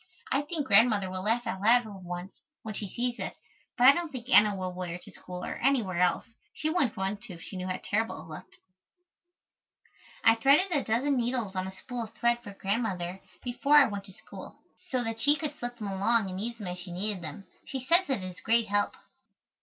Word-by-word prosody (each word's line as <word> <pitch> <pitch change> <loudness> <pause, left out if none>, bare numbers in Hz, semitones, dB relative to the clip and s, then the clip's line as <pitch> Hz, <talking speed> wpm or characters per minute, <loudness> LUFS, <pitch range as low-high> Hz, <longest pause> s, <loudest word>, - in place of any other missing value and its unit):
I 275 - +3
think 295 0 -4
Grandmother 205 -4 +4
will 185 0 -3
laugh 230 +5 0
out 195 -4 -3
loud 240 +4 +5
for 220 - -9
once, 180 0 -8 0.2
when 220 -2 -5
she 205 -1 -4
sees 240 +4 -2
it, - - -4 0.4
but 250 +1 +6
I - - +12
don't 335 +2 -3
think 250 -3 -7
Anna 210 -5 +6
will 185 -1 -4
wear 180 -1 -4
it 180 - -9
to - - -12
school 180 0 -8
or - - -4
anywhere 230 -10 +1
else. 180 -1 +2 0.3
She 310 0 -1
wouldn't 285 -10 +1
want 195 +2 -2
to 185 - -8
if 165 - -12
she - - -7
knew 185 0 -4
how 185 - -2
terrible 220 -2 -1
it - - -14
looked. - - -15 1.7
I 225 - +8
threaded 280 +11 +4
a 290 -5 +1
dozen 260 +5 +1
needles 240 -5 0
on 185 0 -2
a - - -6
spool 240 +4 -6
of 225 - -17
thread 240 0 +1
for 205 - -9
Grandmother, 195 -3 -2 0.2
before 255 +4 +2
I 290 -2 +9
went 200 -3 -4
to 190 - -12
school, - - -12 0.3
so 255 -2 0
that 225 -1 -4
she 290 +3 +6
could 300 -1 -4
slip 240 0 -4
them 210 -3 -4
along 200 +1 +2
and 185 +1 -5
use 235 +2 -4
them 210 - -7
as 180 0 -5
she 175 0 -8
needed 195 +2 -3
them. 170 +4 -8 0.2
She 265 -2 -5
says 345 +3 +4
it 255 -8 0
is 185 -1 -7
a - - -16
great 230 -1 +3
help. 205 0 +1
220 Hz, 230 wpm, -29 LUFS, 190-245 Hz, 1.7 s, I